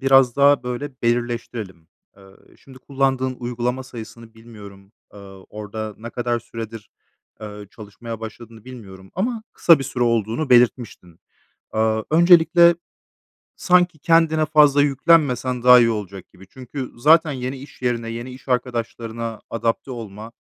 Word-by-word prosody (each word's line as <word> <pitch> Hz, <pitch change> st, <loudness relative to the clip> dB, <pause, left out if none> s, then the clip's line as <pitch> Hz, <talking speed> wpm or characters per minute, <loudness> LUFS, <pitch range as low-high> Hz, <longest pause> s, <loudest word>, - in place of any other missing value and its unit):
biraz 135 Hz, -2 st, +4 dB
daha 140 Hz, 0 st, +4 dB
böyle 125 Hz, +4 st, -5 dB
belirleştirelim. 120 Hz, -7 st, -3 dB, 0.3 s
Iıı, 95 Hz, -1 st, -20 dB
şimdi 130 Hz, -1 st, -16 dB
kullandığın 130 Hz, -1 st, -1 dB
uygulama 125 Hz, +1 st, -3 dB
sayısını 115 Hz, -2 st, -11 dB
bilmiyorum. 105 Hz, -3 st, -14 dB, 0.2 s
Iıı, 95 Hz, -2 st, -13 dB
orada 105 Hz, 0 st, -7 dB
ne 115 Hz, +2 st, -8 dB
kadar 120 Hz, 0 st, -2 dB
süredir, 115 Hz, -2 st, -9 dB, 0.5 s
ııı, 105 Hz, -1 st, -9 dB
çalışmaya 110 Hz, +2 st, -10 dB
başladığını 115 Hz, 0 st, -10 dB
bilmiyorum. 95 Hz, -7 st, -12 dB
Ama 225 Hz, +3 st, -2 dB
kısa 165 Hz, -3 st, +5 dB
bir 135 Hz, -, -5 dB
süre 125 Hz, -1 st, -3 dB
olduğunu 115 Hz, +5 st, -1 dB
belirtmiştin. 120 Hz, -8 st, +1 dB, 0.6 s
Iıı, 110 Hz, 0 st, 0 dB
öncelikle 170 Hz, +1 st, +5 dB, 0.8 s
sanki 180 Hz, -2 st, +2 dB
kendine 160 Hz, 0 st, +2 dB
fazla 150 Hz, -2 st, +4 dB
yüklenmesen 135 Hz, -4 st, +1 dB
daha 125 Hz, 0 st, +8 dB
iyi 115 Hz, -, +3 dB
olacak 100 Hz, -4 st, -6 dB
gibi. 95 Hz, -, -17 dB
Çünkü 130 Hz, +3 st, -8 dB
zaten 155 Hz, +5 st, +4 dB
yeni 130 Hz, 0 st, -5 dB
iş 135 Hz, 0 st, -14 dB
yerine, 120 Hz, -2 st, -2 dB
yeni 120 Hz, +2 st, -7 dB
iş 130 Hz, +2 st, -14 dB
arkadaşlarına 115 Hz, -2 st, -3 dB
adapte 115 Hz, +3 st, -2 dB
olma, 110 Hz, -2 st, -9 dB
120 Hz, 130 wpm, -21 LUFS, 110-135 Hz, 0.8 s, daha